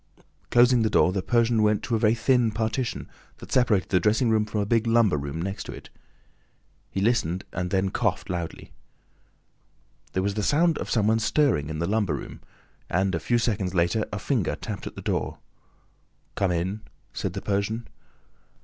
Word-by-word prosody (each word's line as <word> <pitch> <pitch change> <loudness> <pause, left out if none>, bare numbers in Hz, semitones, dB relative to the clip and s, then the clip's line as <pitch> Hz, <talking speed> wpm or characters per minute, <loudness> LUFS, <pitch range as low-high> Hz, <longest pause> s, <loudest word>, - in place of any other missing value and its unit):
Closing 120 0 +5
the 110 - +2
door, 95 -3 +3
the 95 - -1
Persian 115 +1 +2
went 105 -1 +2
to 120 - -1
a - - +1
very 110 0 +3
thin 120 0 +2
partition 110 +3 -2 0.3
that - - -12
separated 115 -7 +2
the 90 - +3
dressing 110 +5 +2
room 110 -1 +2
from 105 0 -2
a - - 0
big 115 +2 +1
lumber 115 -6 +4
room 70 +2 -4
next 95 +3 -4
to - - -7
it. - - -12 1.0
He 95 - -3
listened 95 -5 +1
and 90 -1 -3
then 95 +1 0
coughed - - -1
loudly. 85 -2 -5 1.4
There 95 - 0
was 100 0 -1
a 105 - -1
sound 160 +7 +2
of - - -5
some 110 -4 +2
one 110 +1 +3
stirring 110 - +1
in 80 - -4
the 85 - -1
lumber 105 0 0
room; - - -8 0.5
and, 95 +2 +1
a 85 - 0
few 120 +9 +1
seconds 100 -6 -1
later, 90 +6 +2
a 105 - -3
finger 110 - -1
tapped - - -6
at - - -8
the - - -8
door. - - -2 1.0
"Come 95 -2 0
in," 95 +5 -2 0.3
said - - -3
the - - -4
Persian. 105 +3 -1
105 Hz, 185 wpm, -25 LUFS, 95-115 Hz, 1.4 s, Closing